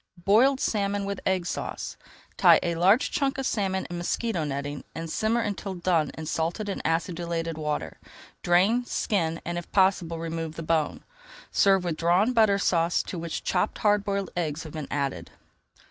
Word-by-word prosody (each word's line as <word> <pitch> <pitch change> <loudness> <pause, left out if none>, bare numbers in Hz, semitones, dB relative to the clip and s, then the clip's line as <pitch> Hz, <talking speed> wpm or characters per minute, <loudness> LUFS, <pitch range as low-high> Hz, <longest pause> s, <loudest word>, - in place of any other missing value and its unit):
BOILED 255 +7 +5
SALMON 200 -3 0
WITH 200 -1 -3
EGG 185 -2 +1
SAUCE - - -4 0.4
Tie - - +6
a 170 - 0
large 190 - +3
chunk 275 -1 0
of 270 - -2
salmon 190 -5 -1
in 175 0 -5
mosquito 175 0 -1
netting 145 0 -4
and 165 0 -4
simmer 225 +5 +1
until 200 -2 -3
done 170 -4 +1
in 160 - -5
salted 165 +7 -2
and 195 - -3
acidulated 165 0 -1
water. 150 -1 -3 0.4
Drain, 190 +8 +3
skin, 165 -8 -1
and, 175 0 -2
if 175 - -12
possible, 185 -4 +2
remove 165 -1 -4
the 165 - -6
bone. 155 -1 0 0.5
Serve 195 -2 +4
with 170 -3 -2
Drawn 180 +8 +3
Butter 215 -4 +4
Sauce 170 -3 +1
to 180 - -6
which 165 -1 -4
chopped 185 +3 0
hard 205 -1 +2
boiled 200 -2 -2
eggs 160 -3 -2
have 155 - -10
been 155 -3 -5
added. 135 -13 -2
175 Hz, 170 wpm, -26 LUFS, 165-200 Hz, 0.5 s, Tie